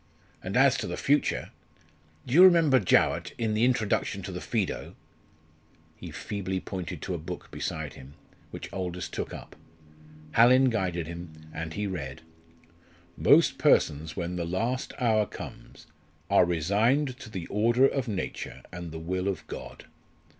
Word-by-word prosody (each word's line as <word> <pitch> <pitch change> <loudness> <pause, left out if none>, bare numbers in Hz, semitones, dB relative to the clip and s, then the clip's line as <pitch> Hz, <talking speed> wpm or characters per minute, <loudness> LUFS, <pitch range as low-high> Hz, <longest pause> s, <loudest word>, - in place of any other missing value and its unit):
And - - -2
as - - +5
to - - -3
the - - -4
future - - +1 0.7
do 125 - -5
you 175 +5 +9
remember 165 -7 +6
Jowett 95 - +2
in 110 -2 0
the 110 +2 +1
Introduction 110 -5 +1
to 95 - -5
the 90 0 -5
Phaedo 110 -6 -2 0.5
" - - -33
He - - -7
feebly 95 -2 -4
pointed 90 -4 -6
to 95 - -3
a 85 - -3
book 75 - -8
beside 80 -3 -4
him, 70 +1 -13 0.3
which - - -8
Aldous 90 -2 -3
took - - -5
up. - - -10 0.8
Hallin 125 +5 +6
guided 90 -6 -1
him 85 0 -8 0.2
and 80 -1 -5
he 105 - -2
read 80 -6 -5 1.0
"_Most - - +5
persons 80 +1 +2
when 90 0 -3
the 85 - -1
last 115 +9 -2
hour 110 -5 +2
comes - - -10 0.5
are 100 - +6
resigned 110 - +1
to 110 - -9
the 95 -5 -5
order 120 +7 +3
of 135 -2 -2
nature 100 -4 -5
and 85 -1 -7
the 80 - -6
will 90 +4 -2
of 95 -4 -3
God. - - -9
95 Hz, 155 wpm, -28 LUFS, 85-115 Hz, 1.0 s, you